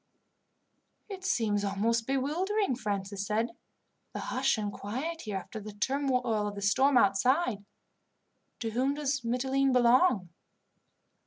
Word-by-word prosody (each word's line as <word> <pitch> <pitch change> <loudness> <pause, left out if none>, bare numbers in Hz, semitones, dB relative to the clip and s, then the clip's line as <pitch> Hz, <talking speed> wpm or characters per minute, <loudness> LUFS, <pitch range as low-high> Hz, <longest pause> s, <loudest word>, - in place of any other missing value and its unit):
"It 380 -2 -7
seems 220 - +1
almost 225 +4 0
bewildering," 315 - 0
Francis 200 -3 -3
said, 215 +3 0 0.6
"the - - -4
hush 260 0 0
and 205 -1 -3
quiet 290 +11 -4
here 210 -3 -4
after 220 +4 -7
the 210 0 -8
turmoil 250 -2 0
of 205 - -5
the 200 - -6
storm 260 +7 +4
outside. 240 - +2 1.0
To 225 -2 -2
whom 260 +5 0
does 280 -1 -1
Mitylene 265 +3 +1
belong?" 245 - +4
240 Hz, 125 wpm, -30 LUFS, 205-275 Hz, 1.0 s, storm